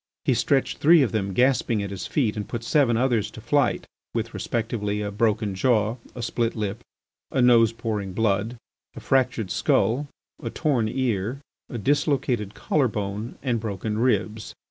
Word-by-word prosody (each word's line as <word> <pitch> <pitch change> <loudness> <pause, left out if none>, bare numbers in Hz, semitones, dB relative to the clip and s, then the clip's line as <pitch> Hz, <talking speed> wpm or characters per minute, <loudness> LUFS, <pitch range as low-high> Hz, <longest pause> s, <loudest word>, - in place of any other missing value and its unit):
He - - +3
stretched 135 -2 +1
three 160 0 +6
of 125 - 0
them 100 -3 -1
gasping 120 -1 +2
at 100 - -5
his 95 -2 -5
feet 120 -8 0
and 105 -1 -4
put 120 -1 -4
seven 120 -3 +3
others 115 -4 +1
to 110 - -11
flight, 125 +4 +1 0.3
with, - - -2
respectively, 110 -3 -2
a 100 - -3
broken 105 -1 0
jaw, 110 +2 +1 0.2
a 120 - -5
split 115 0 -1
lip, 105 -3 -3 0.5
a 135 - -1
nose 120 -3 +6
pouring 110 -4 -4
blood, 110 +3 0 0.4
a - - -7
fractured 125 -7 +1
skull, 135 +6 +1 0.3
a 115 - -3
torn 130 -5 0
ear, 115 -1 -1 0.3
a 120 - -5
dislocated 125 -4 0
collar 145 -4 +1
bone, 105 +1 -4
and 120 -4 0
broken 105 0 -3
ribs. 110 -3 0
115 Hz, 165 wpm, -24 LUFS, 105-125 Hz, 0.5 s, three